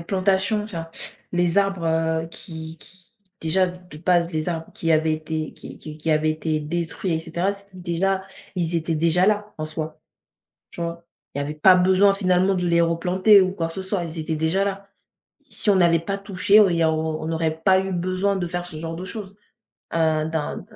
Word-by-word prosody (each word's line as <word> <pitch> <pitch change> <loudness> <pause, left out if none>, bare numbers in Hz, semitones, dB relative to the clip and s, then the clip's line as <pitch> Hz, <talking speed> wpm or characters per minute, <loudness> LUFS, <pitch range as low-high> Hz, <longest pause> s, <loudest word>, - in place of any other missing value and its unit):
plantations, 190 +3 +1
enfin, 165 -6 -6 0.4
les 175 0 +2
arbres, 195 -3 0
heu, 160 0 0
qui 160 -1 -8
qui, 185 +6 -13 0.3
déjà 185 +4 +3
de 180 -3 -11
base, 175 +1 +2
les 155 +1 -1
arbres 165 -2 -4
qui 165 - -2
avaient 160 0 +3
été 155 0 -3
qui - - -11
qui 155 0 -9
qui 160 +1 -1
avaient 155 0 +2
été 155 0 -1
détruits 170 +3 -3
et 160 - -1
cetera, 175 +4 -1
c'était 200 -1 -9
déjà 185 +2 -1 0.3
ils 170 -1 -1
étaient 165 0 0
déjà 170 +3 +3
là, 210 0 0
en 155 - -2
soi. 155 0 -5 0.7
Tu - - -10
vois? 170 0 -4 0.3
Il - - -3
y - - 0
avait 145 +2 -4
pas 185 +5 +6
besoin, 190 +2 +4
finalement, 185 -1 +2
de 180 -1 -1
les 170 0 +3
replanter 180 +5 +4
ou 185 0 0
quoi 170 -4 -2
que 165 - -9
ce 190 - -4
soit, 190 -1 -2
ils 165 0 -5
étaient 160 0 -2
déjà 160 +5 +1
là. 200 0 -4 0.6
Si - - 0
on - - +3
n'avait 170 -2 +5
pas 195 +5 -3
touché, 200 +1 +4
au 205 -3 +6
il 175 - 0
y 165 - +2
a 160 - +3
au 160 0 -2
on 160 - -2
aurait 160 -1 0
pas 190 0 +5
eu 190 - -4
besoin 185 +3 0
de 185 -2 -2
faire 175 +1 -3
ce 180 - -8
genre 165 +1 -5
de 180 +3 -6
choses, 195 0 -6 0.6
heu, 160 -1 +1
dans 160 -2 -2
dans - - -10
170 Hz, 215 wpm, -23 LUFS, 160-190 Hz, 0.7 s, pas